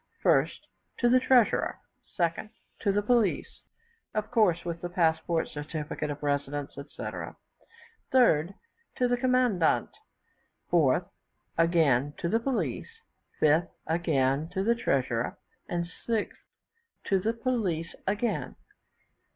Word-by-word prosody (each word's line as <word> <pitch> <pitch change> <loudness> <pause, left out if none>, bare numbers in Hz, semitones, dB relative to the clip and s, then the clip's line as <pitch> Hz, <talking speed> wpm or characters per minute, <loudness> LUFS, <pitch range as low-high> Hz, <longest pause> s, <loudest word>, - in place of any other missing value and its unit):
1st, - - +3 0.4
to 240 - +3
the 255 +1 +6
treasurer; 255 -3 +3 0.4
2nd, 170 +3 0 0.3
to 205 - +1
the 205 +1 +1
police 230 -3 +1 0.5
(of 215 +1 -2
course 200 -8 +3
with 170 -1 -4
the 175 - -4
passport, 165 -1 +1
certificate 150 0 -5
of 145 0 -6
residence, 145 0 -2
etc.); 140 +1 -7 0.8
3rd, 195 - +4 0.4
to 250 - +2
the 245 - +2
commandant; 245 -8 +2 0.8
4th, - - +3 0.5
again 150 -5 +3
to - - -2
the 225 +6 +2
police; 260 - -2 0.5
5th, 155 +3 +3 0.2
again 155 -3 +1
to 190 +2 -2
the 230 +3 +3
treasurer; 125 - -1 0.3
and 175 -1 -1 0.2
6th, 225 -3 0 0.7
to 195 - +2
the 220 +5 0
police 220 -10 -1
again. 210 +4 -1
175 Hz, 115 wpm, -28 LUFS, 155-230 Hz, 0.8 s, the